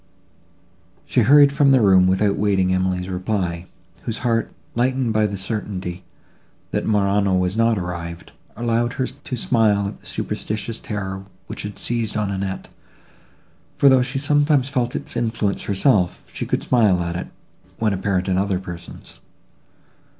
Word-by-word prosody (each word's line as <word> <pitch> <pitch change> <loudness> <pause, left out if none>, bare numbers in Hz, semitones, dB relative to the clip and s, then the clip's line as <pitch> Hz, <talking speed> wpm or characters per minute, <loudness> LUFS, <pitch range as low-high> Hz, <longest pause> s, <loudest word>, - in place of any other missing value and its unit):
She - - +1
hurried 140 +4 +6
from 140 -1 +4
the 135 -1 +6
room, 95 -4 +5
without 100 +2 +2
waiting 95 -3 +1
Emily's 95 -1 0
reply, 90 -2 -2 0.3
whose 115 -1 -4
heart, 115 -1 +1 0.2
lightened 125 -1 +1
by 110 0 +3
the 100 -1 -5
certainty, 95 -3 -4 0.7
that - - -1
Morano 100 -2 +2
was 90 +1 0
not 115 0 +3
arrived, 85 -2 -6 0.3
allowed 120 0 0
her 130 - -1
to 130 0 -6
smile 110 -4 +2
at 100 - -8
the - - -13
superstitious 110 +2 -4
terror, 95 -2 -5 0.2
which - - -6
had 105 0 -6
seized 115 -3 -1
on 105 -2 -1
Annette; 95 -1 -4 1.1
for, 140 - +6
though 130 -1 +5
she 130 +2 -2
sometimes 145 -1 +2
felt 125 -3 -1
its - - -5
influence 115 -4 -1
herself, 100 -3 +1
she - - -4
could - - -1
smile 105 -8 +3
at 85 0 -3
it, 90 - -4 0.5
when 110 -2 +1
apparent 95 -1 -1
in 95 -1 +1
other 100 -1 0
persons. 90 -2 -10
105 Hz, 150 wpm, -21 LUFS, 95-120 Hz, 1.1 s, hurried